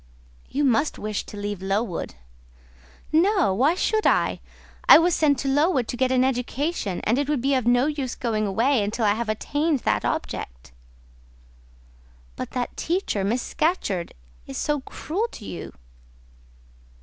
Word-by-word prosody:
"You 290 - -1
must 285 +3 +2
wish 210 -1 -3
to 210 - -9
leave 205 -2 -4
Lowood?" 195 - -2 1.0
"No! 355 - +3
why 275 - +3
should 435 +3 +1
I? - - +2 0.5
I - - +12
was 340 +2 +3
sent 290 -4 +3
to 275 - -3
Lowood 275 -2 +2
to - - -2
get 255 +1 +1
an 255 -1 +3
education; 260 - -1
and 230 +5 +2
it 285 0 -1
would 300 -3 +1
be 275 +3 +1
of 255 -3 +1
no 245 +2 +4
use 285 -5 -2
going 215 -3 -1
away 230 +5 +2
until 215 +3 -1
I 205 - +4
have 225 +1 -3
attained 290 +6 0
that 105 -1 0
object." - - -4 1.6
"But - - -5
that 250 -1 -3
teacher, 335 - -1
Miss 235 +5 0
Scatcherd, 205 - -1 0.3
is 135 - -6
so 295 -1 0
cruel 375 - -3
to 210 - -10
you?" 175 - -7
255 Hz, 155 wpm, -24 LUFS, 210-295 Hz, 1.6 s, I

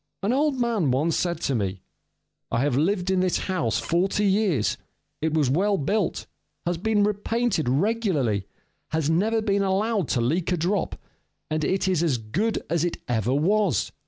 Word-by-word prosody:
An 210 +5 +1
old 285 -1 +1
man 230 - +1
once 150 +6 +1
said 175 -1 -1
to 140 - 0
me: 100 -5 -2 0.7
"I 115 - +1
have 140 -2 +1
lived 180 +5 +1
in 190 - +2
this 185 -1 +1
house 140 - -1
forty 190 +4 +1
years: 195 - +2 0.5
it 160 0 0
was 150 -4 +3
well 195 +10 +2
built, 195 +6 -1 0.4
has 175 -1 -1
been 210 +1 +2
repainted 210 - 0
regularly, 145 - 0 0.4
has 160 -1 0
never 215 +6 +1
been 200 -2 +1
allowed 200 -1 +1
to 125 - 0
leak 160 +10 0
a 180 - +1
drop, 185 +5 -1 0.5
and 155 0 0
it 190 +5 0
is 185 -4 +2
as 155 -7 +1
good 170 - -2
as 170 0 0
it 175 - -1
ever 120 +1 0
was. 180 - +1
175 Hz, 170 wpm, -25 LUFS, 145-205 Hz, 0.7 s, was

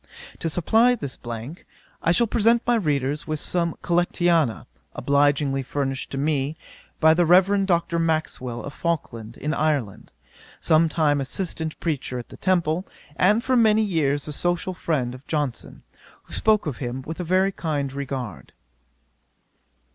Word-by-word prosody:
To 165 - -2
supply 225 +9 +3
this 140 - -6
blank, 120 +7 -7 0.4
I 165 - +2
shall 235 +7 +3
present 230 +1 +3
my 240 - +3
readers 150 - 0
with 155 -1 -2
some 170 0 -1
Collectanea, 170 -6 +1 0.3
obligingly 140 -1 +2
furnished 135 0 -3
to 135 - -5
me 145 +1 -1 0.4
by 160 0 +6
the 175 +2 +3
Rev. 190 +3 +4
Dr. 170 -2 +1
Maxwell, 155 -7 -2
of 140 - -7
Falkland, 120 -10 -3
in 150 +2 -2
Ireland, 145 -11 -1 0.5
some 160 +1 +3
time 150 -3 +1
assistant 160 +2 -3
preacher 145 -6 -2
at 120 - -7
the - - -11
Temple, 175 -1 0 0.3
and 210 +7 +3
for 260 0 +1
many 220 -2 +4
years 145 -8 0
the 150 - -4
social 175 +4 -1
friend 145 -9 -1
of 130 +2 -13
Johnson, 145 -7 -3 0.4
who - - -14
spoke 215 -1 +2
of 150 -6 -3
him 125 0 -4
with 160 +5 -7
a - - -2
very 185 +3 +2
kind 145 -7 -3
regard. 135 -6 -5
155 Hz, 150 wpm, -24 LUFS, 140-175 Hz, 0.5 s, by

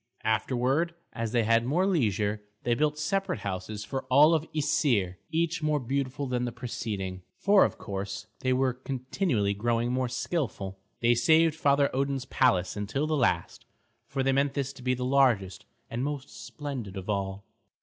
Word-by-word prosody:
Afterward, 130 - +1 0.2
as 115 -1 -3
they 120 -1 +2
had 115 +1 +3
more 155 +10 +1
leisure, 110 - +1 0.2
they 120 - +2
built 150 +4 +1
separate 190 +5 -1
houses 100 +2 -4
for 135 +4 -3
all 145 +5 +6
the 155 - -12
Æsir, 120 - +1
each 165 +1 0
more 150 -1 +1
beautiful 135 +2 -2
than 125 -2 -1
the 120 - -3
preceding, 105 -6 -4 0.2
for 200 -1 +5
of - - 0
course 100 0 -5
they 130 - 0
were 130 0 +2
continually 130 - -1
growing 115 +3 0
more 130 -1 0
skilful. 120 - -3 0.2
They 120 0 +5
saved 160 +7 +4
Father 140 -3 +2
Odin's 135 -1 -1
palace 95 -11 +2
until 105 +8 -1
the 155 0 0
last, 135 - 0 0.4
for 135 -1 -1
they 135 - +3
meant 140 +1 +1
this 140 -1 -2
to 130 - -13
be 125 0 +1
the 125 0 -3
largest 120 -10 +2 0.2
and 120 - -4
the 140 - 0
most 120 -6 -7
splendid 125 -7 -6
of 95 - -6
all. 100 -1 -2
125 Hz, 170 wpm, -28 LUFS, 110-145 Hz, 0.4 s, all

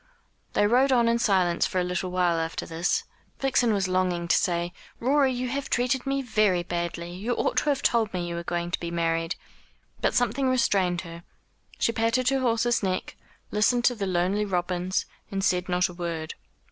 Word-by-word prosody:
They - - +3
rode 255 +5 +4
on 240 -2 +4
in 235 0 +2
silence 185 -6 +2
for 185 - -1
a - - +1
little 180 +1 -2
while 180 -2 +1
after 165 0 -3
this. 165 +1 0 0.3
Vixen 255 -3 +2
was 195 -3 +1
longing 185 -2 0
to - - +5
say: 175 -2 0 0.3
"Rorie, 270 +2 +3
you 250 0 -2
have 275 +2 -3
treated 250 +2 0
me 275 0 0
very 215 -7 +2
badly. 170 0 -4
You 210 +7 -2
ought - - -1
to 255 - +2
have 280 -2 0
told 225 -3 +2
me 175 -2 -3
you 170 - -4
were 170 - -3
going 175 0 -3
to - - -1
be 170 - -4
married." 165 0 -1 0.7
But - - +1
something 245 +3 +1
restrained 195 -8 +2
her. 170 -1 -9 0.6
She - - +2
patted 230 +3 +1
her 270 0 +1
horse's 240 -1 +1
neck, 185 -2 -2 0.4
listened 240 +3 +2
to 250 - +5
the 200 -3 -3
lonely 185 +3 +1
robins, 180 -1 -1 0.2
and 195 -1 -3
said 180 -1 +1
not 180 0 +2
a 180 - -10
word. 170 -2 -4
190 Hz, 195 wpm, -26 LUFS, 175-240 Hz, 0.7 s, to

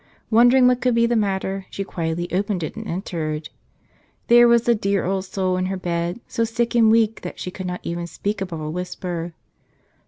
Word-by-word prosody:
Wondering 245 +3 +6
what 250 0 +2
could 250 -2 +2
be 235 0 +4
the 235 0 +1
matter, 195 -2 -1
she 200 - -4
quietly 170 -2 -3
opened 195 -1 0
it - - -5
and 220 0 -7
entered. 160 -4 -4 0.8
There 240 0 +8
was 235 -1 +4
the 240 - +4
dear 200 -3 0
old 190 +1 -1
soul 185 -1 -1
in 185 0 -1
her 190 0 -2
bed, 175 +1 -2
so 230 - -1
sick 235 +1 -1
and 230 -2 +5
weak 225 0 +3
that 180 - -7
she 180 - -5
could 185 0 -6
not 180 0 -4
even 170 0 -4
speak 200 +5 -3
above 175 -4 -4
a 155 0 -4
whisper. 175 -1 -5
190 Hz, 205 wpm, -22 LUFS, 175-225 Hz, 0.8 s, There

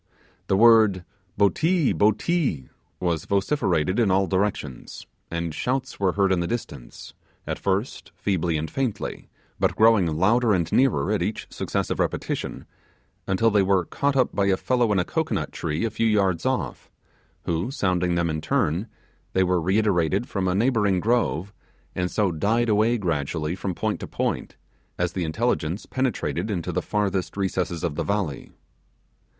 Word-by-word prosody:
The 95 - +2
word 110 -5 +5 0.3
'botee! 155 - +2
botee!' 110 - +1 0.3
was 85 -3 -1
vociferated 100 - +1
in 115 -4 +3
all 95 +1 +3
directions; 95 -9 -3 0.2
and 85 -1 -3
shouts 130 - -2
were 95 -2 +2
heard 100 -1 +2
in 95 - +2
the 85 - -1
distance, 70 - -6 0.3
at - - -4
first 100 +6 -2
feebly 90 -5 0
and 80 +1 -4
faintly; 130 -6 -3 0.3
but - - +1
growing 110 -5 +5
louder 105 +9 +2
and 85 -3 -1
nearer 130 -5 +2
at 105 -4 +1
each 105 +5 -2
successive - - -2
repetition, - - -2 0.6
until 110 +4 +2
they 105 -1 +4
were 95 -2 +2
caught 140 +8 -1
up 130 -2 +2
by 100 -1 +1
a 95 -1 +3
fellow 120 -1 +1
in 100 - +2
a 90 - +1
cocoanut - - -2
tree 80 +6 -2
a 115 - -2
few 115 - 0
yards 100 -3 +1
off, 130 -1 -3 0.5
who 85 +7 -1
sounding 90 -8 0
them 85 -1 +1
in 80 0 -3
turn, 85 +7 0 0.5
they 95 - +3
were 90 -1 +1
reiterated 95 +2 +1
from 95 -2 -2
a 90 - +1
neighbouring 105 -4 +2
grove, 105 -4 0 0.4
and 90 0 -1
so 100 -2 +1
died 110 +9 +1
away 110 +3 +3
gradually 80 -3 -2
from 95 -1 -4
point 80 - -2
to - - -6
point, - - -3 0.4
as 90 0 0
the 90 - -2
intelligence 85 0 -1
penetrated 130 -3 -2
into 90 -6 -2
the - - -1
farthest 100 -2 -2
recess 90 -3 -2
of 85 -3 -1
the 85 +3 -2
valley. 95 -5 -2
95 Hz, 160 wpm, -24 LUFS, 85-110 Hz, 0.6 s, word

